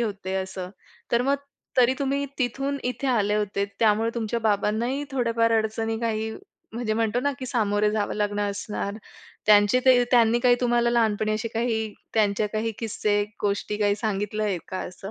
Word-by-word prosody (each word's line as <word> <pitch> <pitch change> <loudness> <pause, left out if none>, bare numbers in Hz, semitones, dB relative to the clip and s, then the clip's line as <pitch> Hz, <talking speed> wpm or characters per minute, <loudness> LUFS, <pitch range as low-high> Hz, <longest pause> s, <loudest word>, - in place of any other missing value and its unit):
होते 200 -4 -3
असं. 190 -1 -4 0.4
तर 235 +1 +4
मग 275 +2 +2 0.4
तरी 255 0 +5
तुम्ही 280 0 0
तिथून 275 +2 -1
इथे 250 +2 -2
आले 210 -5 +2
होते. 205 -1 0
त्यामुळे 225 +1 +3
तुमच्या 235 0 -2
बाबांनाही 220 +6 0
थोड्याफार 230 -3 +1
अडचणी, 225 +1 -2
काही 220 -1 -1 0.4
म्हणजे 230 -1 -2
म्हणतो 225 +1 +1
ना, 285 +2 0
की 255 - -5
सामोरे 210 -4 +1
जावं 210 -1 -1
लागणं 205 -1 0
असणार. 200 0 -4 0.5
त्यांचे 210 +3 +5
काही 255 -1 +5
त्यांनी 235 -1 +5
काही 245 0 +5
तुम्हाला 240 -1 +2
लहानपणी 220 -2 +1
असे 220 +2 -3
काही 225 -1 -1 0.2
त्यांचे 210 -1 +2
काही 220 +1 -1
किस्से, 210 -2 0 0.2
गोष्टी 205 +1 -1
काही 205 -1 +2
सांगितले 210 0 -2
आहे 200 -4 0
का 185 - -3
असं? 195 +2 -9
220 Hz, 165 wpm, -25 LUFS, 205-240 Hz, 0.5 s, तरी